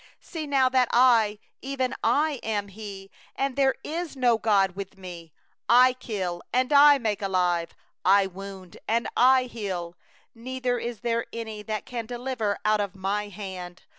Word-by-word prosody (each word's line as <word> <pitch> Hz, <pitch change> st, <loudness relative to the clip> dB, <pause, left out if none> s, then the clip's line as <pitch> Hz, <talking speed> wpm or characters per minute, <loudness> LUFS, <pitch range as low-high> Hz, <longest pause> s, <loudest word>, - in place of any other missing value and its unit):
39See 315 Hz, -4 st, -7 dB
now 270 Hz, -2 st, +4 dB
that 255 Hz, -1 st, +3 dB
I, 230 Hz, -4 st, +4 dB, 0.2 s
even 260 Hz, -1 st, -2 dB
I, 295 Hz, -2 st, +2 dB
am 205 Hz, -2 st, -2 dB
He, 195 Hz, -1 st, -9 dB, 0.2 s
And 275 Hz, -1 st, -1 dB
there 270 Hz, -1 st, +3 dB
is 330 Hz, -1 st, -4 dB
no 245 Hz, -4 st, +2 dB
god 195 Hz, -4 st, +2 dB
with 195 Hz, -1 st, -7 dB
Me; 175 Hz, -4 st, -10 dB, 0.4 s
I 250 Hz, +2 st, +7 dB
kill, 190 Hz, -8 st, -4 dB
and 255 Hz, +3 st, +1 dB
I 290 Hz, 0 st, +8 dB
make 215 Hz, -6 st, -2 dB
alive; 180 Hz, -3 st, 0 dB, 0.3 s
I 195 Hz, +2 st, +5 dB
have 190 Hz, -2 st, -6 dB
wounded, 190 Hz, -2 st, -10 dB
and 230 Hz, +2 st, +1 dB
I 255 Hz, +1 st, +5 dB
heal; 190 Hz, -8 st, -5 dB, 0.4 s
And 255 Hz, +3 st, -7 dB
there 245 Hz, -1 st, +1 dB
is 235 Hz, -1 st, -6 dB
none 230 Hz, -2 st, -3 dB
that 215 Hz, -1 st, -2 dB
can 235 Hz, -3 st, -5 dB
deliver 240 Hz, -4 st, -2 dB
out 215 Hz, 0 st, +3 dB
of 200 Hz, -1 st, -4 dB
My 200 Hz, +2 st, -2 dB
hand. 185 Hz, -3 st, -8 dB
220 Hz, 165 wpm, -26 LUFS, 195-255 Hz, 0.4 s, I